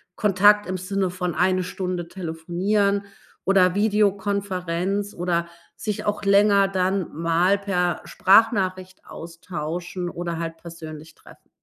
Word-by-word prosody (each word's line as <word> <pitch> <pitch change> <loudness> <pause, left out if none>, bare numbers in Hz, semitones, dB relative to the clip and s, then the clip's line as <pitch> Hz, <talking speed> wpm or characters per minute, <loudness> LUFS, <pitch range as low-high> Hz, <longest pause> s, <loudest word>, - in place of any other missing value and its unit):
Kontakt 205 +1 +4
im 185 0 -2
Sinne 190 0 -1
von 180 -1 -3
eine 185 0 +2
Stunde 180 -1 -4
telefonieren 190 +4 -1 0.4
oder 185 -2 +4
Videokonferenz 200 -2 0
oder 170 -1 -1 0.3
sich 210 -2 -4
auch 205 0 -1
länger 200 0 +5
dann 190 -1 -1
mal 170 +4 +2
per 180 -4 -1
Sprachnachricht 190 -3 +2
austauschen 170 +1 -6
oder 170 -1 -4
halt 165 -1 -4
persönlich 160 -2 -10
treffen. - - -19
185 Hz, 115 wpm, -23 LUFS, 170-200 Hz, 0.4 s, länger